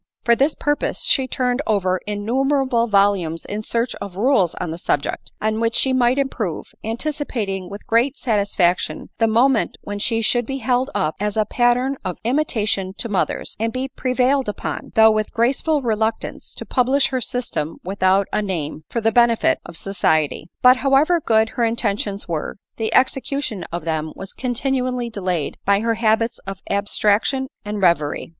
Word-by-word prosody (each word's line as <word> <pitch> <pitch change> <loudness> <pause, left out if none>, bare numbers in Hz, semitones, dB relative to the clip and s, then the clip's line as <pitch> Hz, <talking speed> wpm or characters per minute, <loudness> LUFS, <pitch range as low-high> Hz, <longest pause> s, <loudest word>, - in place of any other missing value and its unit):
For 235 - +4
this 275 +5 +2
pur 290 0 +1
pose - - -3
she 265 -2 +2
turned 250 0 0
over 185 -3 +1
innumerable 245 +3 +1
volumes 195 -6 +2
in 210 +1 -4
search 230 +2 -1
of 200 -3 -6
rules 205 - +2
on 165 - -4
the 165 - -6
subject, 145 -4 -2
on 215 0 0
which 230 0 0
she 265 - +2
might 250 0 +3
improve, 230 - -3
an 225 +1 -3
ticipating 230 - -3
with 200 +1 -9
great 245 +5 +2
satisfaction 200 -8 0
the 225 - +4
moment 235 +2 +2
when 205 0 -5
she 225 +2 0
should 240 +1 +1
be 270 - -3
held 255 +1 0
up 155 +1 0
as 210 +1 -2
a 215 - +3
pattern 245 +4 +1
of 185 -3 -4
imitation 215 -7 0
to 230 - -4
mothers, 195 -3 -1
and 225 +1 0
be 260 +1 -3
prevailed 255 0 +1
upon, 210 - -5
though 220 0 +7
with 215 -1 -1
graceful 275 +5 +1
reluctance, 220 -1 -2
to - - -6
publish 265 +2 +2
her 260 -2 -1
system 235 - -3
without 190 +1 +2
a - - +1
name, 160 -6 -4
for 235 - -2
the 225 +1 +2
benefit 235 0 +3
of 170 -1 -9
society. 160 -5 0
But 250 +1 +7
however 280 +6 +3
good 220 -3 +3
her 240 - -2
intentions 210 -3 -1
were, 165 -3 -3 0.2
the 220 -1 -2
execution 260 -6 0
of 170 -1 -4
them 160 -1 -2
was 195 - -8
continually 250 -1 -2
delayed 180 -7 -2
by 200 +1 +3
her 230 0 +1
habits 225 +1 +1
of 195 -1 -5
abstrac 205 +1 +2
tion 265 -1 -1
and 210 -1 -4
reverie. 170 -5 +1
225 Hz, 175 wpm, -21 LUFS, 195-255 Hz, 0.2 s, though